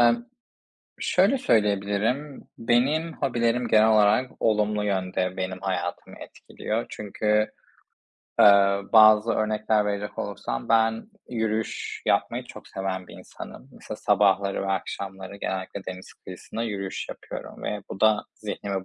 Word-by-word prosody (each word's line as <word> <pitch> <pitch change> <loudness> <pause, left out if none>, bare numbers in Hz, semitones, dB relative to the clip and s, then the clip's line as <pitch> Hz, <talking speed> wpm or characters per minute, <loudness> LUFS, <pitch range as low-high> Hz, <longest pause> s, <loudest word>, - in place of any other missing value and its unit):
Emm, 120 - +4 0.8
şöyle 195 +9 +3
söyleyebilirim: 110 - 0 0.2
Benim 140 +8 +1
hobilerim 120 -3 0
genel 110 0 +5
olarak 110 +4 +4
olumlu 105 -1 +1
yönde 95 -2 -1
benim 95 0 -3
hayatımı 95 -2 -3
etkiliyor. 110 +2 -5
Çünkü, 105 +1 0 0.9
eee, 100 -1 +6
bazı 110 0 +7
örnekler 110 0 +1
verecek 105 0 -3
olursam 60 -11 -4
ben 115 - +2 0.2
yürüyüş 110 -2 -3
yapmayı - - +1
çok - - -12
seven 95 -1 -4
bir - - -13
insanım. - - -11
Mesela - - -8
sabahları 100 0 +2
ve 95 0 -1
akşamları 95 0 -5
genellikle 95 0 -4
deniz 95 0 -8
kıyısında 95 +5 -8
yürüyüş 100 -4 -4
yapıyorum - - -8
ve 105 -2 -3
bu - - -7
da 110 -1 +4
zihnimi 100 -2 -4
105 Hz, 120 wpm, -25 LUFS, 95-115 Hz, 0.9 s, bazı